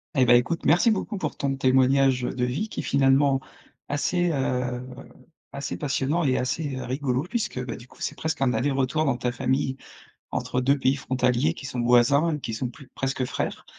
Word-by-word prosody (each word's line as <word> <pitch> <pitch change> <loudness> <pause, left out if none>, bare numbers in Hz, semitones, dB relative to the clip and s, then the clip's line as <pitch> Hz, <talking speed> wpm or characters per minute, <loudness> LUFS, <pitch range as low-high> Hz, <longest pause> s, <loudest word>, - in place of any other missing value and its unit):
Et 130 -2 +4
bah, 120 - +6
écoute, 125 +8 +1
merci 180 +7 +5
beaucoup 210 0 -2
pour 155 -5 -4
ton 135 -1 -1
témoignage 130 0 +3
de 125 0 -2
vie, 140 - -2
qui - - -5
est - - -10
finalement, 135 0 +3 0.5
assez, 175 +5 0
heu, 125 -2 -1 0.7
assez 140 0 -4
passionnant 145 +3 0
et 130 - +2
assez, 135 +2 -2
heu, 130 - -5
rigolo 130 0 -1
puisque, 180 - -3
bah, 120 - -5
du 125 0 -13
coup, - - -19
c'est - - -3
presque 160 -3 -3
un 130 -2 +3
aller-retour 135 +3 0
dans 135 -3 +2
ta 125 0 -1
famille, 130 +2 -1 0.5
entre 125 - -1
2 140 +2 +2
pays 130 +1 +2
frontaliers 130 +3 +1
qui 140 - -10
sont 125 -3 -3
voisins 140 +7 +4
et - - -6
qui 115 - -5
sont 120 +2 -3
plu 130 +2 -14
presque 135 -1 -1
frères. - - -4
135 Hz, 195 wpm, -25 LUFS, 125-145 Hz, 0.7 s, bah